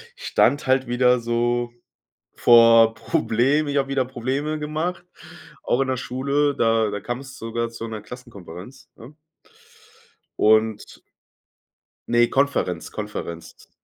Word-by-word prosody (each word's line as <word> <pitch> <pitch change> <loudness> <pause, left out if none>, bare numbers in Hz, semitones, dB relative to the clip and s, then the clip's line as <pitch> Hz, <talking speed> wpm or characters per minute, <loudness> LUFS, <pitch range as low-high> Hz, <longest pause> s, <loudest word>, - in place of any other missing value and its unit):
ich - - -11
stand 145 -1 +2
halt 130 -1 +2
wieder 125 0 +3
so 120 +1 -1 0.6
vor 115 -1 +6
Problemen, 135 +4 0
ich 145 0 0
habe 135 0 -1
wieder 135 -1 0
Probleme 130 +5 -3
gemacht, 160 +4 -4 0.6
auch 125 - 0
in 135 - 0
der 130 - 0
Schule, 140 +3 -1
da 115 -3 +1
da 105 0 -5
kam 120 +5 -5
es 135 -1 -12
sogar 115 +1 -3
zu 115 0 -7
'ner 110 -2 -7
Klassenkonferenz, 120 0 -12
ne? 130 +7 -14 1.2
und 110 0 +1 1.1
ne, 120 0 +4
Konferenz 135 -8 -1
Konferenz, 105 -5 -8
120 Hz, 125 wpm, -22 LUFS, 115-135 Hz, 1.2 s, vor